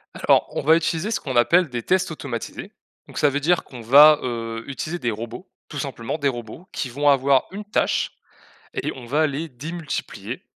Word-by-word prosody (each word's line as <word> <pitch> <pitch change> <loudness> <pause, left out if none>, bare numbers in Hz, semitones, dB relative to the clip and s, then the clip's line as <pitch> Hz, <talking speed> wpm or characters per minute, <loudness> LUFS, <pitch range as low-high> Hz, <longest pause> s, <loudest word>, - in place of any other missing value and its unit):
Alors, - - +3
on - - 0
va 160 +3 +5
utiliser 165 +3 0
ce 225 - 0
qu'on 130 -3 -5
appelle 165 +9 +4
des 120 -2 -3
tests 185 +7 +1
automatisés. 140 -7 -6 0.4
Donc, - - -11
ça 145 - +4
veut 140 +1 -1
dire 170 +4 +2
qu'on 125 -3 -11
va, 145 +6 +8
heu, 115 -2 -4
utiliser 155 +5 -4
des 120 - -1
robots, 115 - -7 0.2
tout 145 - -6
simplement, 130 -1 -4
des 140 - +1
robots 120 - -5
qui 140 - -3
vont 145 +4 +1
avoir 135 -1 +3
une 205 +2 -7
tâche 210 - 0 0.6
et - - -2
on 130 - -9
va 150 +6 +2
les 150 +3 -4
démultiplier, 155 +5 -6
140 Hz, 195 wpm, -23 LUFS, 120-160 Hz, 0.6 s, va